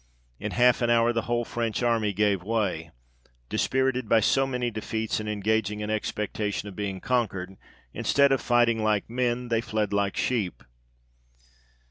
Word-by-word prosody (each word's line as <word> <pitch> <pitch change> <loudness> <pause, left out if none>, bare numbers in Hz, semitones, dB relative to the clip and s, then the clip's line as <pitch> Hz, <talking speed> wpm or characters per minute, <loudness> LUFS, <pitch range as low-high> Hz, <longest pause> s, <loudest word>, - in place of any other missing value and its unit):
In - - -4
half 125 0 +4
an 120 - +2
hour, 120 0 +4
the 115 - 0
whole 120 0 +1
French 115 0 -2
army 115 -3 +2
gave 100 -1 +1
way: 95 -6 -1 0.6
dispirited 130 -3 0
by 115 - +5
so 135 +4 +2
many 125 -2 -2
defeats, 110 0 -2
and 105 0 -4
engaging 105 0 0
in 105 0 -3
expectation 105 -1 -2
of 100 - -9
being 100 -1 -3
conquered, 95 -6 -1 0.4
instead 140 -1 +3
of 135 - +2
fighting 120 -2 +2
like 105 -2 +1
men, 125 0 -1
they 115 -1 +1
fled 110 -3 -2
like 100 -1 0
sheep. 110 -8 -1
110 Hz, 155 wpm, -26 LUFS, 105-120 Hz, 0.6 s, by